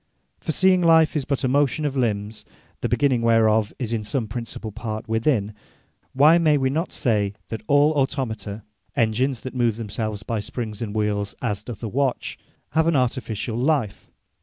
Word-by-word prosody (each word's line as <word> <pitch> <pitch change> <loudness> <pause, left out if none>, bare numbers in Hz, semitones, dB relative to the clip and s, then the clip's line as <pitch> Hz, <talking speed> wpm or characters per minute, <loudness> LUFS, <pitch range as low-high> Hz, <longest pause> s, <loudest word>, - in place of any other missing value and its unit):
For - - -3
seeing 185 +2 +4
life 165 -1 +5
is 145 -3 -1
but 140 -1 -1
a - - +3
motion 145 +3 +1
of 140 -2 -1
Limbs, 105 -4 -1 0.4
the - - -2
begining 135 -5 +2
whereof 110 -2 +3
is 120 -3 -3
in 110 -2 -1
some 110 +2 -1
principall 115 -1 -6
part 110 -1 -5
within; 110 -2 +1 0.6
why 150 +6 +6
may 155 -3 +4
we 130 -1 +1
not 160 +5 -1
say, 105 -4 0 0.2
that 110 - -5
all 145 +1 +5
Automata 125 -8 -2 0.3
(Engines 120 +1 +1
that 130 - -7
move 120 -4 +1
themselves 110 -1 -4
by 115 0 -2
springs 105 0 -5
and 110 -2 -4
wheeles 105 -1 -1
as 105 -3 -2
doth 115 -1 -8
a - - -1
watch) 135 +3 -1 0.3
have 160 +1 +2
an 165 - +3
artificiall 120 -2 -1
life? 135 -9 0
120 Hz, 175 wpm, -23 LUFS, 110-140 Hz, 0.6 s, why